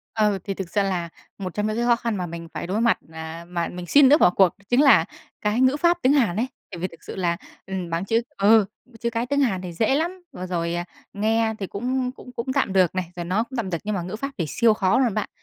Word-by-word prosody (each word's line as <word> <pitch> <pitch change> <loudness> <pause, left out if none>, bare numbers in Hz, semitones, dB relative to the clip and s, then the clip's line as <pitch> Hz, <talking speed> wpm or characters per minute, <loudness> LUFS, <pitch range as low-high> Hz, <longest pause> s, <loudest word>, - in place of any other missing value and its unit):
Ừ, 210 -3 +2
thì 195 - -3
thực 190 -2 -5
ra 205 - +2
là 180 -3 -1 0.3
một 185 -3 -5
trong 210 0 -1
những 215 - -1
cái 235 - 0
khó 240 -1 +4
khăn 230 -3 -2
mà 180 - -2
mình 170 0 -7
phải - - -4
đối 200 +4 -1
mặt, 235 0 +3
à, 160 +1 -7
mà 170 -1 -2
mình 180 0 -7
suýt 285 - +6
nữa 280 +3 +8
bỏ - - +6
cuộc 185 +1 +3
đó - - -23
chính 245 +3 +4
là 280 - +6 0.4
cái 210 +4 0
ngữ 260 +2 +4
pháp 345 +3 +3
tiếng 260 - +4
Hàn 235 -11 +2
ấy. 235 +4 +1 0.2
Tại 175 - -7
vì 185 +2 -2
thực 165 - -17
sự - - -8
là, 175 -2 0 0.3
ừm, 185 -3 -4
bảng 165 +2 -1
chữ 225 +3 +2 0.2
ừ, 210 +2 +5 0.4
chữ 235 - -1
cái 235 +1 -2
tiếng 285 +2 +1
Hàn 195 -9 +1
thì 180 - -6
dễ 220 +9 +1
lắm, 350 +5 -1
và 185 - -6
rồi, 170 -2 -2
à, 175 0 -2 0.3
nghe 220 +2 +1
thì 195 - -3
cũng 250 +6 -2
cũng 250 -1 -13
cũng 240 +2 -3
tạm 260 -8 +1
được 185 -3 +3
này, 185 -1 -1
rồi 175 - -4
nói 190 +6 0
cũng 260 - -6
tạm 205 -5 -2
được, 170 - -1
nhưng 210 - -1
mà 185 - -2
ngữ 185 +4 -5
pháp 275 +5 -4
thì 170 - 0
siêu 230 -2 +3
khó 195 +1 +2
luôn 245 -6 +2
bạn, 215 - -1
210 Hz, 285 wpm, -24 LUFS, 180-240 Hz, 0.4 s, nữa